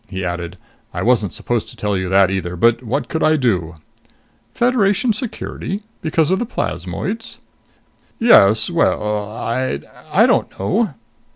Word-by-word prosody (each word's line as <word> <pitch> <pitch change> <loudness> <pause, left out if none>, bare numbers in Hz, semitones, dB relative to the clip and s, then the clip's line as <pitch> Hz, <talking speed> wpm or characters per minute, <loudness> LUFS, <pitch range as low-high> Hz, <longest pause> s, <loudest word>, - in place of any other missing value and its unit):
He 95 -1 -4
added, 85 0 -4 0.4
"I - - -2
wasn't 110 -6 +2
supposed 120 -2 -2
to - - -12
tell 105 -1 -1
you 95 -1 -2
that 95 0 +4
either, 90 -2 -3
but 115 +6 +3
what 125 +4 -2
could 160 - -3
I 155 - +4
do?" 95 - 0 0.8
"Federation 235 -1 +2
security? 210 -2 -5 0.2
Because 160 0 +1
of 190 - +2
the 240 - -1
plasmoids?" 190 - -4 0.8
"Yes.... 115 - +5
Well.... 105 -11 0
I'd 115 - -3 0.3
I - - +5
don't - - +1
know." 185 - 0
115 Hz, 145 wpm, -19 LUFS, -, 0.8 s, Yes